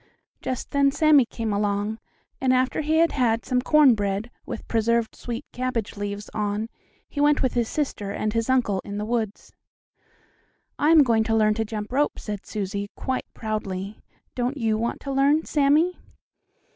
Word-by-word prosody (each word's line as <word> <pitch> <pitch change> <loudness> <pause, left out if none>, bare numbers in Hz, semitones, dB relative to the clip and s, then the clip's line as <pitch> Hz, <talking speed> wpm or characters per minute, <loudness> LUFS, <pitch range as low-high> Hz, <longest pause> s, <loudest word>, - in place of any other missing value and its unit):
Just 255 - -4
then 280 0 +4
Sammie 290 -3 +4
came 225 -3 -3
along, 205 +2 -1 0.4
and, 260 -1 +3
after 255 +3 +2
he 310 +1 0
had 335 +1 +4
had 230 -4 +1
some 250 -1 +1
corn 295 -1 +6
bread 205 +2 -2 0.2
with - - -6
preserved 230 0 +1
sweet 240 +3 -6
cabbage 250 -4 -3
leaves 205 0 -5
on, 210 +1 -2 0.4
he 285 - -3
went 295 -1 +4
with 260 - +1
his 235 -2 0
sister 270 -9 -2
and 215 +2 -2
uncle 235 -7 +2
in 200 0 -6
the 210 - -2
woods. 220 -2 -3 1.3
"I 300 - +3
am 320 -2 +8
going 230 -4 +2
to 225 0 +1
learn 215 -1 +4
to 225 +1 -1
jump 210 0 -5
rope," 285 +3 +1
said 210 -2 -6
Susie, 200 -1 -3
quite 260 -1 -3
proudly. 205 -2 -4 0.3
"Don't 250 +3 -2
you 225 -4 +1
want 230 +2 -2
to 275 - -5
learn, 280 +3 +3
Sammie?" 305 +5 +2
230 Hz, 170 wpm, -24 LUFS, 210-275 Hz, 1.3 s, am